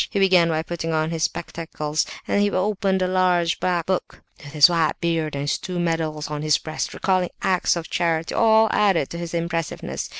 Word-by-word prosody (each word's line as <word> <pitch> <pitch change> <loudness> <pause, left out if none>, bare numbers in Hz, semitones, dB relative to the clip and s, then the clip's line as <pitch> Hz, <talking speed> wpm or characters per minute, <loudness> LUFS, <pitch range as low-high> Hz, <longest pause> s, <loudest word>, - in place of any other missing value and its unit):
He - - -4
began 185 -3 +4
by 160 -1 0
putting 165 -1 -4
on 155 +1 0
his 165 -1 -3
spectacles, 155 -2 -3 0.2
then 205 - +1
he 205 - +3
opened 190 -1 0
a - - +1
large 180 -2 +1
black 175 -2 0
book; 185 -1 -3 0.2
his 150 -1 +5
white 165 -3 0
beard, 165 -3 -1
and 140 - -3
his 145 - -1
two 180 -1 -5
medals 160 -3 -2
on 150 0 -5
his 155 0 +3
breast, 155 0 -5
recalling 185 -2 0
acts 185 -1 +2
of 170 -1 -5
charity, 165 -2 -1
all 220 -1 +4
added 190 -9 +2
to 170 - -5
his 170 0 -5
impressiveness. 165 -1 -3
170 Hz, 195 wpm, -22 LUFS, 160-185 Hz, 0.2 s, his